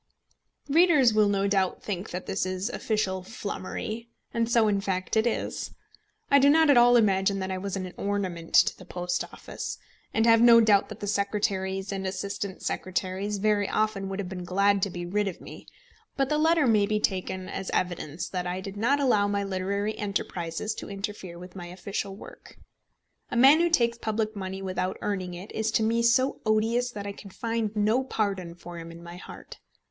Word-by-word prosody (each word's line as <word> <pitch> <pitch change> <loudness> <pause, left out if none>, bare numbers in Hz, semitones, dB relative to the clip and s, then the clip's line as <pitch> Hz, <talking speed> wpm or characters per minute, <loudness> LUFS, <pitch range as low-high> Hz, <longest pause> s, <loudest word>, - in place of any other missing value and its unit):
Readers 295 -6 +5
will 215 -1 +4
no 200 -1 +1
doubt 195 -2 0
think 195 0 -4
that 180 +1 -5
this 190 - -1
is 185 +4 -2
official 190 -4 -1
flummery; 215 +3 -5 0.2
and 230 0 0
so 230 -2 +4
in 200 -1 +1
fact 185 0 -2
it 220 +2 +3
is. 235 - -3 0.6
I 280 - +7
do 280 +1 +6
not 315 0 +6
at - - +5
all 240 0 +7
imagine 195 -3 +2
that 190 0 -3
I 185 - -2
was 195 0 -4
an 185 -2 -5
ornament 190 -5 -3
to - - +5
the - - -13
Post 180 0 -2
Office, - - -6 0.3
and 225 - +2
have 230 -1 +6
no 235 -1 +8
doubt 210 -3 +4
that - - -9
the - - -3
secretaries 195 -1 -1
and 195 -1 -3
assistant 195 0 -4
secretaries 190 +2 -2
very 205 0 +1
often 215 -3 0
would 195 - -4
have 200 -2 -3
been 180 -1 -6
glad 200 +2 +2
to 200 - +1
be 175 -1 -5
rid 205 +3 0
of 185 - -5
me; - - -11 0.5
but 270 -1 +1
the 300 - +1
letter 320 -1 +4
may 210 -4 +4
be 210 0 +1
taken 185 -2 -2
as 190 - -5
evidence 175 -3 -2
that 180 -1 -3
I 180 +1 -2
did 195 +1 -7
not 255 +7 +2
allow 215 -7 +3
my 200 0 0
literary 200 +2 -2
enterprises 195 -1 -3
to - - -7
interfere 195 -3 -6
with 180 +1 -11
my 175 -2 -7
official 195 +2 -5
work. - - -13 0.7
A - - -2
man 270 +6 +7
who 345 0 +3
takes 235 -7 +2
public 220 -1 -2
money 190 -1 -5
without 185 0 -2
earning 185 -3 -3
it 185 +4 -9
is 220 0 -1
to 220 - +3
me 230 +1 +2
so 235 +3 +2
odious 225 +3 +1
that 205 -4 -7
I 200 - -3
can 200 0 -11
find 225 +1 -2
no 215 +5 +2
pardon 195 -8 -2
for 175 0 -9
him 165 0 -8
in 170 +1 -12
my 170 +1 -9
heart. - - -11
200 Hz, 200 wpm, -27 LUFS, 185-225 Hz, 0.7 s, no